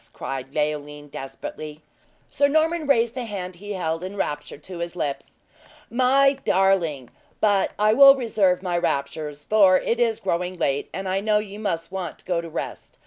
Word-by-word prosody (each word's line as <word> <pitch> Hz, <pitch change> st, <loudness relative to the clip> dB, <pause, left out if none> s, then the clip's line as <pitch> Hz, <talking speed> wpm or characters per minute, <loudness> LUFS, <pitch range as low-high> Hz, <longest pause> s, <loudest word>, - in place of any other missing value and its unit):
cried 135 Hz, 0 st, -5 dB
Leoline 150 Hz, -1 st, -2 dB
desperately. 150 Hz, +3 st, -8 dB, 0.5 s
Sir 285 Hz, -, +3 dB
Norman 315 Hz, +2 st, +1 dB
raised 235 Hz, -4 st, +3 dB
the 250 Hz, -1 st, -4 dB
hand 185 Hz, -4 st, -6 dB
he 205 Hz, +3 st, -6 dB
held, 165 Hz, -2 st, -2 dB
in 190 Hz, +2 st, -6 dB
rapture 145 Hz, -7 st, -3 dB
to 180 Hz, +3 st, -9 dB
his 170 Hz, 0 st, -4 dB
lips: 145 Hz, -5 st, -4 dB, 0.5 s
"My 270 Hz, +3 st, +3 dB
darling! 175 Hz, -9 st, +1 dB, 0.3 s
But 205 Hz, -2 st, +2 dB
I 215 Hz, +1 st, +4 dB
will 275 Hz, +3 st, +9 dB
reserve 205 Hz, -8 st, +1 dB
my 175 Hz, -2 st, 0 dB
raptures, 145 Hz, -1 st, -3 dB
for 195 Hz, -4 st, +5 dB
it 235 Hz, +5 st, -1 dB
is 230 Hz, -2 st, +2 dB
growing 180 Hz, 0 st, -2 dB
late, 140 Hz, -3 st, -1 dB
and 190 Hz, 0 st, -5 dB
I 190 Hz, +1 st, 0 dB
know 210 Hz, +1 st, +2 dB
you 210 Hz, -1 st, -5 dB
must 165 Hz, -6 st, -3 dB
want 185 Hz, -4 st, -5 dB
to -, -, -17 dB
go 175 Hz, -2 st, 0 dB
to 165 Hz, -, -8 dB
rest. -, -, -6 dB
185 Hz, 175 wpm, -24 LUFS, 160-220 Hz, 0.5 s, will